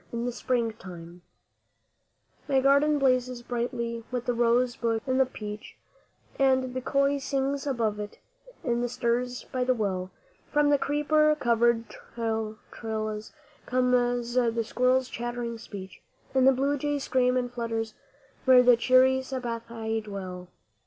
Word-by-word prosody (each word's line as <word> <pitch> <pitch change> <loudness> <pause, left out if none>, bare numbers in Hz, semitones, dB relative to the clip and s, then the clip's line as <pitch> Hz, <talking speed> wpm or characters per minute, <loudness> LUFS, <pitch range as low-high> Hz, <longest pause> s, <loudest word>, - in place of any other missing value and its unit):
IN 235 +1 -2
SPRING 235 -2 -1
TIME 175 -1 -10 1.3
My 270 -2 +3
garden 280 +3 +4
blazes 255 -3 +1
brightly 235 -1 -3
with 250 -1 -3
the 245 - +1
rose 240 +1 +2
bush 230 -1 0
and 260 0 +1
the 265 - +4
peach, 210 -3 -8 0.6
And 260 -2 +2
the 255 - -3
köil 275 +2 +1
sings 275 +1 -1
above 225 -6 0
it, 205 0 -6 0.5
in 240 -2 0
the 245 - -1
siris 245 +1 -1
by 255 -1 -2
the 255 0 +2
well, 190 -4 -2 0.4
From 295 -1 +3
the 285 - +4
creeper 305 +1 +2
covered 235 -1 +2
trellis 220 -1 -5 0.4
comes 245 -1 +1
the 235 -2 +2
squirrel's 255 +3 +2
chattering 240 -1 -4
speech, 195 -4 -9 0.3
And 260 -1 +4
the - - +8
blue 275 +2 0
jay 290 +1 0
screams 255 -2 +1
and 245 -1 -2
flutters 225 -2 -3 0.5
where 255 -1 +7
the 245 -1 +6
cheery 255 +2 +5
satbhai 230 -4 -4
dwell. 185 -3 -7
245 Hz, 140 wpm, -27 LUFS, 230-260 Hz, 1.3 s, the